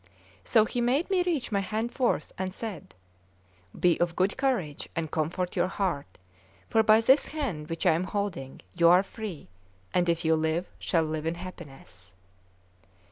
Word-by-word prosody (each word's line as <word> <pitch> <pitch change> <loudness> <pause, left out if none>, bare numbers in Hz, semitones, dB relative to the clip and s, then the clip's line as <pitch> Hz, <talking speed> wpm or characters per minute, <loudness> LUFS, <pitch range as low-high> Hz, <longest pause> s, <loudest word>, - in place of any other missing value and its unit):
So 215 - +4
he 245 - -2
made 270 +10 +1
me 370 -2 +3
reach 325 -10 -1
my 200 - +2
hand 220 +4 -2
forth, 255 -3 0
and 185 0 -3
said: 220 -6 -6 0.8
"Be 175 -2 +3
of 170 -1 0
good 190 +2 +1
courage 245 - -1
and 160 -2 -3
comfort 170 +3 -2
your - - +2
heart, 185 -7 -3 0.5
for 225 - +5
by 220 0 +5
this 265 +5 +4
hand 225 - -4
which 165 0 -3
I - - +6
am 165 +3 0
holding 185 -9 -4
you 170 -1 +5
are 180 +2 +6
free, 200 - -7 0.5
and 175 -1 +2
if 170 -1 0
you 160 - +4
live, 160 +2 0
shall 165 -3 +1
live 155 0 -3
in 165 - -1
happiness." 135 - -11
185 Hz, 170 wpm, -28 LUFS, 160-220 Hz, 0.8 s, I